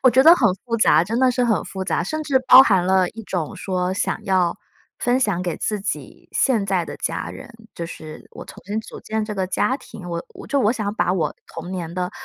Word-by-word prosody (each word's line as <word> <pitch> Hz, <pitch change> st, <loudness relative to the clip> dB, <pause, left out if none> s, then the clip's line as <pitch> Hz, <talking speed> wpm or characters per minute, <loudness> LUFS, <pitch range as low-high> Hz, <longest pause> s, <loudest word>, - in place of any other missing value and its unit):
我 255 Hz, -, +7 dB
觉 260 Hz, +2 st, +5 dB
得 330 Hz, +4 st, +9 dB
很 235 Hz, -, +3 dB
复 230 Hz, -2 st, -1 dB
杂， 175 Hz, -6 st, +4 dB
真 230 Hz, +5 st, -2 dB
的 260 Hz, -1 st, +4 dB
是 250 Hz, 0 st, +1 dB
很 225 Hz, -3 st, +1 dB
复 190 Hz, -1 st, -5 dB
杂， 175 Hz, -, 0 dB
甚 310 Hz, -, -3 dB
至 275 Hz, -3 st, +2 dB
包 260 Hz, +1 st, +11 dB
含 190 Hz, -8 st, +3 dB
了 185 Hz, -1 st, +3 dB
一 225 Hz, -, -9 dB
种 175 Hz, -7 st, -3 dB
说 185 Hz, -1 st, -2 dB
想 200 Hz, -, -2 dB
要 185 Hz, -3 st, +1 dB, 0.4 s
分 245 Hz, +1 st, +1 dB
享 195 Hz, -7 st, 0 dB
给 175 Hz, -2 st, -3 dB
自 210 Hz, -2 st, -2 dB
己 200 Hz, -, -6 dB
现 235 Hz, -7 st, +2 dB
在 190 Hz, -3 st, 0 dB
的 -, -, -8 dB
家 -, -, -3 dB
人， -, -, -10 dB, 0.2 s
就 170 Hz, -, -5 dB
是 155 Hz, -2 st, -10 dB
我 -, -, -9 dB
重 -, -, -13 dB
新 210 Hz, +3 st, -2 dB
组 -, -, -11 dB
建 220 Hz, 0 st, -2 dB
这 210 Hz, -1 st, -5 dB
个 190 Hz, -1 st, -1 dB
家 210 Hz, +7 st, 0 dB
庭， 195 Hz, -9 st, -11 dB
我 170 Hz, -1 st, -7 dB
就 280 Hz, -1 st, +1 dB
我 220 Hz, 0 st, +3 dB
想 210 Hz, -3 st, -3 dB
把 180 Hz, -, +1 dB
我 185 Hz, -4 st, -1 dB
童 165 Hz, +2 st, -8 dB
年 170 Hz, -3 st, -5 dB
的 180 Hz, 0 st, -2 dB
200 Hz, 255 characters per minute, -22 LUFS, 180-235 Hz, 0.4 s, 包